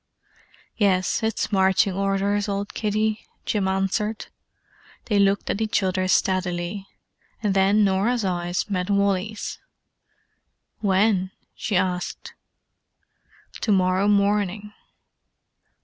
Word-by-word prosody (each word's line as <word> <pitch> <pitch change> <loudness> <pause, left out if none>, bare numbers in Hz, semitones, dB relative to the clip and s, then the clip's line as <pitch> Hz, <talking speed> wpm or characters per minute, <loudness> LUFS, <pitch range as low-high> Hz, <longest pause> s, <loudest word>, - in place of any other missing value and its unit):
"Yes, 190 -3 +2
it's 220 0 -1
marching 190 0 +3
orders, 195 +1 0
old 200 0 -3
kiddie," 215 0 -1 0.2
Jim 200 -3 0
answered. 195 +3 -1 0.8
They 210 -3 +1
looked 200 0 +2
at 210 - -3
each 215 -2 +1
other 185 0 0
steadily: 185 +1 0 0.6
and 205 -2 +1
then 195 +2 +4
Norah's 205 +4 +1
eyes 175 -1 -1
met 185 -2 -2
Wally's. 200 +1 -1 1.2
"When?" 195 -1 +2 0.2
she 210 - -3
asked. 180 -1 -2 1.3
"To 215 - 0
morrow 185 0 +2
morning." 205 0 +1
200 Hz, 100 wpm, -24 LUFS, 190-210 Hz, 1.3 s, then